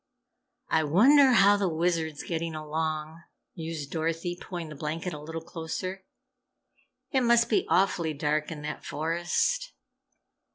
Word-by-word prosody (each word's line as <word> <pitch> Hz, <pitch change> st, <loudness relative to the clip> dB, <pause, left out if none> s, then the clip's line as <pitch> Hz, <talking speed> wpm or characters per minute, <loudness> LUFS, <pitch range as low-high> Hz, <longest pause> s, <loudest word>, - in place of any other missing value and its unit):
"I 160 Hz, 0 st, +3 dB
wonder 255 Hz, -, +6 dB
how 205 Hz, -2 st, +6 dB
the 195 Hz, -2 st, +1 dB
Wizard's 160 Hz, -2 st, -1 dB
getting 165 Hz, -1 st, -3 dB
along!" 155 Hz, +1 st, -3 dB, 0.3 s
mused 160 Hz, -3 st, -5 dB
Dorothy, 165 Hz, +2 st, -2 dB
pulling 175 Hz, -2 st, -7 dB
the 155 Hz, -, -8 dB
blanket 160 Hz, +4 st, -4 dB
a 150 Hz, -, -6 dB
little 160 Hz, +1 st, -6 dB
closer. 180 Hz, +3 st, -5 dB, 1.1 s
"It 265 Hz, -, +2 dB
must 235 Hz, -1 st, +4 dB
be 215 Hz, -, +2 dB
awfully 170 Hz, -5 st, +2 dB
dark 150 Hz, +1 st, 0 dB
in 150 Hz, -2 st, -7 dB
that 150 Hz, -, -5 dB
forest." 175 Hz, -, -1 dB
165 Hz, 130 wpm, -28 LUFS, 155-190 Hz, 1.1 s, wonder